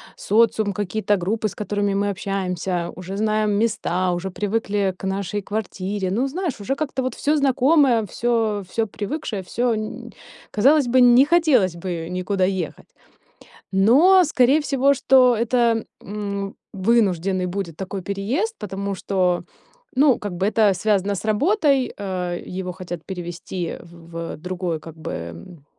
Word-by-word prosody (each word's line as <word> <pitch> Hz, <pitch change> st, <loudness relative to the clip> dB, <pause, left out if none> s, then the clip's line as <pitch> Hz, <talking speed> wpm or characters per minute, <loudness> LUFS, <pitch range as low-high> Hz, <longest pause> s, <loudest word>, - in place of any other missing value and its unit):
социум, 215 Hz, -1 st, +2 dB
какие-то 205 Hz, +2 st, -1 dB
группы, 210 Hz, +5 st, -1 dB
с 205 Hz, -, -8 dB
которыми 205 Hz, 0 st, -1 dB
мы 200 Hz, +1 st, 0 dB
общаемся, 185 Hz, -3 st, -2 dB
уже 185 Hz, +1 st, -7 dB
знаем 215 Hz, 0 st, +1 dB
места, 200 Hz, -4 st, 0 dB
уже 175 Hz, +2 st, -3 dB
привыкли 205 Hz, -1 st, -1 dB
к -, -, -7 dB
нашей 195 Hz, +1 st, -2 dB
квартире. 195 Hz, -2 st, -3 dB
Ну, 240 Hz, +7 st, +1 dB
знаешь, 330 Hz, -, -3 dB
уже 265 Hz, +7 st, -1 dB
как-то 275 Hz, -3 st, -2 dB
вот 255 Hz, -1 st, -2 dB
всё 300 Hz, +2 st, +1 dB
знакомое, 275 Hz, -2 st, +4 dB
всё 225 Hz, -1 st, 0 dB
всё 225 Hz, +2 st, -1 dB
привыкшее, 210 Hz, -1 st, -4 dB
всё 235 Hz, +5 st, 0 dB
нь 215 Hz, 0 st, -6 dB, 0.4 s
казалось 275 Hz, +5 st, +4 dB
бы, 255 Hz, +2 st, +3 dB
не 245 Hz, +2 st, +7 dB
хотелось 290 Hz, -, +3 dB
бы 170 Hz, -1 st, -5 dB
никуда 185 Hz, +1 st, 0 dB
ехать. 185 Hz, -5 st, -4 dB, 0.9 s
Но 285 Hz, -, +6 dB
скорее 270 Hz, -1 st, +3 dB
всего, 280 Hz, -1 st, +2 dB
что 255 Hz, -2 st, +5 dB
это, 235 Hz, -1 st, +2 dB, 0.2 s
м, 200 Hz, -1 st, -5 dB, 0.2 s
вынужденный 190 Hz, -3 st, +1 dB
будет 180 Hz, -3 st, -4 dB
такой 190 Hz, +1 st, -5 dB
переезд, 225 Hz, -, -2 dB
потому 200 Hz, 0 st, -4 dB
что, 180 Hz, -2 st, 0 dB, 0.5 s
ну, 275 Hz, -2 st, +5 dB
как 205 Hz, -2 st, -5 dB
бы 190 Hz, +2 st, 0 dB
это 210 Hz, -2 st, +3 dB
связано 200 Hz, +1 st, +1 dB
с 195 Hz, -, -6 dB
работой, 275 Hz, -, +2 dB
э, 180 Hz, -3 st, -3 dB, 0.2 s
его 180 Hz, -1 st, -4 dB
хотят 175 Hz, -2 st, -7 dB
перевести 175 Hz, -1 st, -5 dB
в 170 Hz, 0 st, -8 dB
в -, -, -8 dB
другой 180 Hz, -1 st, -3 dB
как 160 Hz, 0 st, -11 dB
бы, 160 Hz, -, -6 dB
ам, 85 Hz, -, -8 dB
205 Hz, 145 wpm, -22 LUFS, 185-240 Hz, 0.9 s, не